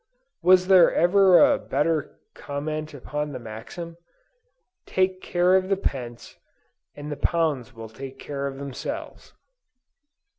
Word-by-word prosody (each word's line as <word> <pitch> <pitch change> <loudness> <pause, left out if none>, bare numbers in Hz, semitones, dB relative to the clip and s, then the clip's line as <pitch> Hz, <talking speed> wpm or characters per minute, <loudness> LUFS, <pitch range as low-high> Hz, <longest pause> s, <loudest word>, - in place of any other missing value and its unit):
Was 185 +1 +5
there 185 -2 +6
ever 185 +1 +5
a 285 -1 +5
better 150 +1 -1
comment 155 +2 -5
upon 150 +2 -4
the 130 - -5
maxim? 120 +10 -9 0.9
"Take 185 0 0
care 175 +1 +2
of 190 0 +1
the 195 - +2
pence, 120 -9 -5 0.6
and 145 +1 -7
the - - -3
pounds 145 -7 -1
will 115 0 -8
take 135 +4 -9
care 140 0 -5
of 135 -1 -6
themselves." 140 0 -7
150 Hz, 125 wpm, -24 LUFS, 135-180 Hz, 0.9 s, there